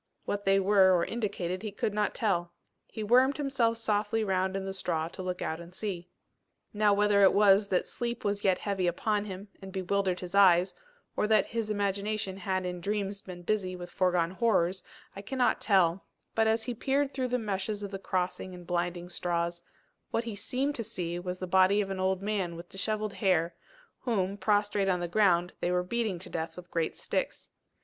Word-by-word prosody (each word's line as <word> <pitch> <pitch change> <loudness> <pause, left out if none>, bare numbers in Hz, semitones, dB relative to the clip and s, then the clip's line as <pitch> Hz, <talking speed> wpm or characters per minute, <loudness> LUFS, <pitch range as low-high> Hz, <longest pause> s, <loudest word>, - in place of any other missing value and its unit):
What 205 0 -3
they 195 0 +4
were 190 -2 +5
or 170 - +1
indicated 195 -5 -3
he 215 -2 -4
could 205 +1 -2
not 210 -1 0
tell. 175 -5 0 0.3
He 220 - -6
wormed 255 +5 +4
himself 265 -6 +1
softly 215 0 0
round 190 -1 0
in 195 - -4
the 195 - -4
straw 165 -4 -2
to 185 - -8
look 180 -1 -3
out 160 - -3
and 170 +1 -11
see. 185 -4 -4 0.6
Now 210 0 +3
whether 205 0 +4
it 195 - +6
was 200 0 +5
that 185 -2 0
sleep 235 -2 -4
was 205 0 -1
yet 190 -2 +3
heavy 195 -3 -1
upon 210 +4 0
him, 195 0 -7
and 190 0 -8
bewildered 190 0 0
his 180 0 -7
eyes, 185 -2 +5 0.4
or 210 - +1
that 215 -2 +4
his 225 -2 -3
imagination 200 -1 -1
had 185 -1 -2
in 180 -1 -4
dreams 200 +1 -2
been 180 -3 -9
busy 185 -2 -1
with 175 -1 -8
foregone 180 -2 +1
horrors, 190 -3 +1 0.3
I 195 - -6
cannot 250 +4 0
tell; 190 -3 +3 0.3
but, 225 0 +3
as 220 0 +2
he 245 - -3
peered 275 +4 0
through 260 -1 -1
the 250 0 0
meshes 205 -1 -3
of 200 - -5
the 195 - -5
crossing 185 0 -2
and 180 -1 -11
blinding 175 0 -2
straws, 170 -1 -2 0.5
what 230 - 0
he 230 -3 -5
seemed 270 +7 -1
to 230 - -2
see 175 -6 -4
was 180 0 -4
the 185 - -4
body 190 +2 +4
of 195 -2 -1
an 190 - -3
old 190 0 0
man 195 -5 -1
with 170 +1 -10
dishevelled 215 +2 -2
hair, 175 -5 +1 0.5
whom, 200 -6 -1
prostrate 205 0 +1
on 180 -1 +2
the 175 - -2
ground, 175 -2 +3
they 175 - 0
were 180 0 +1
beating 220 -1 -1
to 170 - -8
death 160 0 -3
with 175 -1 -11
great 165 -2 -1
sticks. - - -3
195 Hz, 200 wpm, -29 LUFS, 180-210 Hz, 0.6 s, it